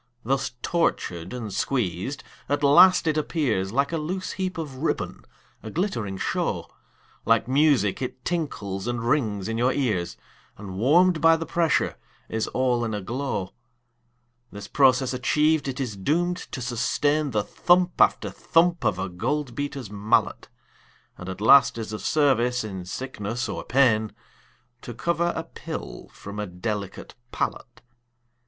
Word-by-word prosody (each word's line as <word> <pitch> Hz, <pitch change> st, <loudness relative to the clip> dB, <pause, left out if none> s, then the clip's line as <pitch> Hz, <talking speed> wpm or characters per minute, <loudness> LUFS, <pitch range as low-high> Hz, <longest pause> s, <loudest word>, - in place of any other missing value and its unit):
Thus 135 Hz, +2 st, -1 dB
tortured 90 Hz, -, -1 dB
and 115 Hz, -5 st, -5 dB
squeezed, 120 Hz, +1 st, -2 dB, 0.3 s
at 145 Hz, +1 st, 0 dB
last 180 Hz, +7 st, +7 dB
it 155 Hz, -1 st, +2 dB
appears 125 Hz, -, -1 dB
Like 140 Hz, +6 st, +1 dB
a 165 Hz, -, -1 dB
loose 185 Hz, +5 st, -3 dB
heap 185 Hz, -1 st, -3 dB
of 150 Hz, -5 st, -5 dB
ribbon, 155 Hz, +5 st, -3 dB, 0.4 s
a 110 Hz, -, -7 dB
glittering 115 Hz, -, -2 dB
show, -, -, -2 dB, 0.6 s
Like 115 Hz, 0 st, +2 dB
music 135 Hz, -7 st, +2 dB
it 130 Hz, 0 st, -5 dB
tinkles 110 Hz, -, -3 dB
and 120 Hz, -1 st, -2 dB
rings 110 Hz, -8 st, 0 dB
in 115 Hz, 0 st, -2 dB
your 125 Hz, +2 st, +3 dB
ears, 110 Hz, -12 st, -1 dB, 0.4 s
And 95 Hz, -2 st, -7 dB
warm'd 165 Hz, -, +4 dB
by 165 Hz, +1 st, +6 dB
the 165 Hz, -, -4 dB
pressure 165 Hz, -2 st, +1 dB, 0.3 s
is 110 Hz, 0 st, -1 dB
all 125 Hz, -2 st, 0 dB
in 110 Hz, -2 st, -2 dB
a 105 Hz, -, -4 dB
glow. 110 Hz, -2 st, -3 dB, 1.0 s
This 100 Hz, 0 st, -8 dB
process 130 Hz, -1 st, +3 dB
achiev'd, 150 Hz, +4 st, +2 dB
it 135 Hz, -1 st, -4 dB
is 125 Hz, -6 st, -3 dB
doom'd 170 Hz, -, 0 dB
to 125 Hz, -, -5 dB
sustain 145 Hz, +5 st, 0 dB
The 105 Hz, -5 st, 0 dB
thump 175 Hz, -, +2 dB
after -, -, +3 dB
thump 170 Hz, +1 st, +2 dB
of 90 Hz, -, +1 dB
a 95 Hz, -, -2 dB
gold 125 Hz, +9 st, -2 dB
beater's 140 Hz, -4 st, -5 dB
mallet, 105 Hz, +1 st, 0 dB, 0.7 s
And 90 Hz, -, -8 dB
at 95 Hz, +2 st, -7 dB
last 135 Hz, +3 st, +6 dB
is 110 Hz, -1 st, -5 dB
of 110 Hz, -, -5 dB
service 125 Hz, -5 st, +2 dB
in 95 Hz, -4 st, -6 dB
sickness 120 Hz, +2 st, -4 dB
or -, -, -5 dB
pain 115 Hz, -5 st, +2 dB, 0.7 s
To 120 Hz, -, -8 dB
cover 170 Hz, +7 st, 0 dB
a 160 Hz, -, -3 dB
pill -, -, -8 dB
from 105 Hz, +1 st, -9 dB
a 105 Hz, -, -3 dB
delicate 100 Hz, +2 st, -5 dB, 0.2 s
palate. 120 Hz, -, -4 dB
125 Hz, 150 wpm, -25 LUFS, 105-150 Hz, 1.0 s, last